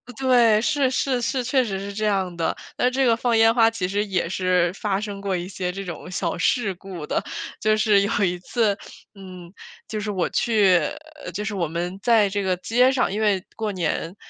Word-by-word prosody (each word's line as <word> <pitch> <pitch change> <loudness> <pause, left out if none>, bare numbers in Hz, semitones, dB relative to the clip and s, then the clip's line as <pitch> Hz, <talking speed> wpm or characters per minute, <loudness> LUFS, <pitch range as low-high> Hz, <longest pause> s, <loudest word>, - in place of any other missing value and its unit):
对， 240 -4 +4
是 285 0 +1
是 255 -1 0
是， 255 +2 -1
确 255 +1 +2
实 195 -4 -3
是 200 +1 -6
这 215 +2 -2
样 190 -4 0
的， 165 - -1 0.2
那 250 - +3
这 265 +1 +1
个 230 -2 +3
放 235 -1 +1
烟 225 0 +5
花 225 -2 +5
其 200 -5 -3
实 205 +2 0
也 185 -4 -1
是 180 -2 +1
发 195 0 -2
生 205 -2 -5
过 195 -1 -2
一 175 +1 -4
些 185 -2 -3
这 195 +2 -5
种 175 -2 -8
小 180 -2 -2
事 205 +3 +1
故 180 -3 -8
的。 - - -1 0.4
就 215 0 +2
是 215 -1 +4
有 200 - 0
一 180 -1 0
次， 210 +1 0 0.4
嗯， 185 -3 -11 0.3
就 215 - -5
是 210 0 -4
我 190 -4 -1
去 205 -6 +3 0.5
呃， - - -4
就 210 - -3
是 210 0 -3
我 180 -4 -1
们 175 +4 -4
在 220 -2 +4
这 200 +1 -2
个 190 -2 0
街 230 +8 +2
上， 260 -5 +1
因 205 - -2
为 205 -4 +1
过 215 -2 -2
年， 170 0 -2
200 Hz, 230 characters per minute, -23 LUFS, 185-225 Hz, 0.5 s, 烟